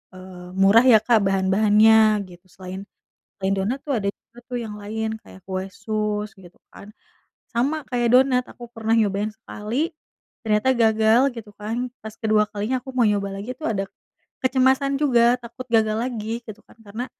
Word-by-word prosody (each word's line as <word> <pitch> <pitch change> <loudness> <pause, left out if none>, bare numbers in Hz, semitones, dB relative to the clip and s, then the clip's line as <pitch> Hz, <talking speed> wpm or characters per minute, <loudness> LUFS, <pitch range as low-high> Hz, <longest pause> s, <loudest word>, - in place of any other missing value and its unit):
eee, 185 -1 -11
murah 200 +5 +6
ya 225 -4 +7
Kak 230 -2 +4
bahan-bahannya, 210 +2 +4
gitu. 175 +1 -16
Selain 190 +1 -8 0.6
selain 190 +1 0
donat 235 +8 -1
tuh 285 - -1
ada 200 - -3
juga 235 - -14
tuh 250 - -5
yang 215 -2 -6
lain, 220 +1 -4
kayak 190 - -15
kue 190 0 -3
sus 210 -1 -3
gitu 175 -2 -16 0.2
kan, 200 - -13 0.6
sama 280 +7 -1
kayak 240 -1 +1
donat, 255 -1 +4
aku 240 -1 -12
pernah 225 -1 -2
nyobain 210 -1 +1
sekali, 225 +7 -4 0.6
ternyata 215 +4 +2
gagal 220 +1 +4
gitu 220 -2 -9
kan, 230 +4 -3
pas 220 0 -7
kedua 215 -1 +2
kalinya 215 +5 -2
aku 265 - -8
mau 255 - +1
nyoba 200 -1 -1
lagi 245 +5 -6
tuh 315 - -7
ada 195 -1 -2 0.6
kecemasan 265 +2 +2
juga, 240 -3 +4
takut 235 +2 -9
gagal 220 -1 +2
lagi 230 -1 -4
gitu 220 -1 -10
kan. - - -21
Karena 220 +5 -5
220 Hz, 170 wpm, -23 LUFS, 205-240 Hz, 0.6 s, ya